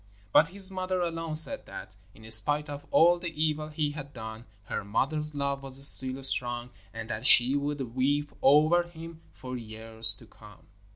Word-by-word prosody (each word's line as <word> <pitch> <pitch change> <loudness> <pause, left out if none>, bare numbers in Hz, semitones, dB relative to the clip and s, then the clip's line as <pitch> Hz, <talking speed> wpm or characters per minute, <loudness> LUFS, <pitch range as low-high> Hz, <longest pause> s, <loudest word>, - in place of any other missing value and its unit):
But 150 - +4
his 195 +2 -4
mother 185 0 -4
alone 165 -2 -5
said 165 - +1
that, 95 0 -11 0.2
in 110 0 -16
spite 145 +6 0
of 145 0 -10
all 175 +1 +3
the 175 -1 -4
evil 155 -1 -2
he 150 -1 -4
had 145 -1 -11
done, 110 0 -10 0.2
her - - -6
mother's 150 +9 -3
love 140 -1 -4
was 135 0 0
still 130 0 +3
strong 120 -2 -2 0.2
and 110 0 -9
that 110 +4 0
she 125 +2 +5
would 140 -4 -5
weep 145 +3 -2
over 155 +5 +3
him 165 -1 -12
for 130 0 -10
years 110 -1 +6
to - - -13
come. 105 -3 -19
140 Hz, 175 wpm, -26 LUFS, 120-155 Hz, 0.2 s, years